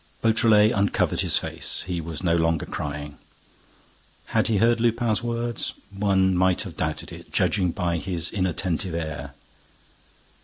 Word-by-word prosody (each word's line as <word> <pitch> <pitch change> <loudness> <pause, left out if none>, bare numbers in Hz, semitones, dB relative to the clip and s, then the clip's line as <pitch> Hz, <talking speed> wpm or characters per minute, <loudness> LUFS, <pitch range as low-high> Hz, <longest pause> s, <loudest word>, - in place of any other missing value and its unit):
Beautrelet 110 -1 +5
uncovered 100 -2 +1
his - - +2
face. - - -1
He 90 -2 -3
was 80 +1 -7
no 85 -2 +3
longer 80 -2 +1
crying. 75 0 -5 1.1
Had - - +3
he 110 - +2
heard 115 +3 +3
Lupin's 115 -2 +1
words? 120 -1 -2 0.2
One 95 -2 +2
might 95 0 +2
have - - -9
doubted - - -3
it, - - -11
judging 95 -4 +2
by 85 -1 -1
his 90 -1 -2
inattentive 90 -2 -1
air. 80 -4 -5
95 Hz, 140 wpm, -24 LUFS, 85-110 Hz, 1.1 s, Beautrelet